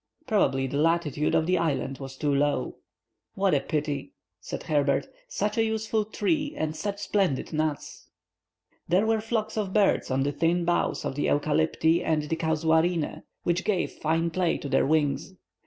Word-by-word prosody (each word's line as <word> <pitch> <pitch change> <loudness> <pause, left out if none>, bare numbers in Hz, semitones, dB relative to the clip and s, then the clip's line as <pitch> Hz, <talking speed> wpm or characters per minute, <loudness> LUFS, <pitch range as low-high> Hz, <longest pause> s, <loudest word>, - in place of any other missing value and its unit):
Probably 135 - +2
the 140 +2 -2
latitude 160 -2 +1
of 160 - +3
the 180 +1 +2
island 140 -5 -1
was 135 -1 -8
too 145 0 0
low. 140 -2 0 0.6
"What 195 -1 +2
a 145 - +4
pity!" 145 +1 -3 0.3
said - - -6
Herbert, 145 -2 +1 0.2
"such - - -1
a - - +4
useful 220 -1 0
tree 295 +8 -1
and 155 0 -2
such 200 +6 -3
splendid 190 -13 0
nuts!" 155 -1 -3 0.8
There 185 +5 +3
were 220 -1 +1
flocks 220 -1 -2
of 200 -3 -2
birds 210 -2 +2
on 135 +1 +1
the 145 - 0
thin 170 +4 +1
boughs 175 0 0
of - - -2
the 145 - -1
eucalypti 160 +3 +2
and 155 -2 +1
the 150 +2 -2
casuarinæ, 160 +1 +1 0.2
which 175 +1 0
gave 195 -4 0
fine 165 +2 0
play 180 0 +1
to 140 - -6
their 135 - +2
wings. 150 +3 0
160 Hz, 170 wpm, -27 LUFS, 145-195 Hz, 0.8 s, a